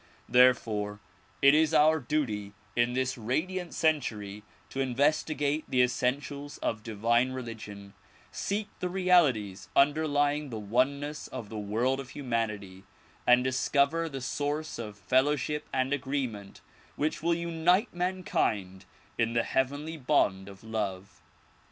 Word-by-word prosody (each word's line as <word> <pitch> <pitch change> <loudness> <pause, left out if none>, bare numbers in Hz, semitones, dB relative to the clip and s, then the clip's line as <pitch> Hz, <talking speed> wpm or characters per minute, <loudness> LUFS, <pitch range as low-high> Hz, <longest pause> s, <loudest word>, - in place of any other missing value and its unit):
There 125 +1 +7
fore 105 -3 -4 0.4
it 140 +1 +8
is 155 0 +3
our 155 +1 +5
duty 115 -8 -2 0.2
in 120 +1 +2
this 130 0 -1
radiant 170 +10 -2
century 110 -10 -1 0.3
to 135 - -5
investigate 145 +3 +1
the 125 -1 +4
essen 125 +2 +1
tials 145 0 -8
of 110 - -1
divine 115 +4 +1
religion, 105 -5 -8 0.4
seek 205 +1 -2
the 180 - -2
realities 135 - +2
underlying 145 0 +2
the 115 - -5
oneness 140 +8 -1
of 105 - -7
the 110 - -5
world 115 +6 0
of 135 -2 -7
humanity 105 -8 -3 0.4
and 125 0 +6
discover 140 +5 +1
the 135 -3 -6
source 145 +3 -3
of 105 -3 -6
fellowship 145 +6 +1
and 130 +1 0
agreement 130 -8 -3 0.3
which 155 +2 -1
will 170 +1 +2
unite 170 +5 +1
mankind 175 - -1 0.3
in 115 0 +1
the 115 0 +2
heavenly 145 +5 -1
bond 100 -9 +1
of 100 +1 -13
love. 100 -3 -4
130 Hz, 130 wpm, -29 LUFS, 110-150 Hz, 0.4 s, it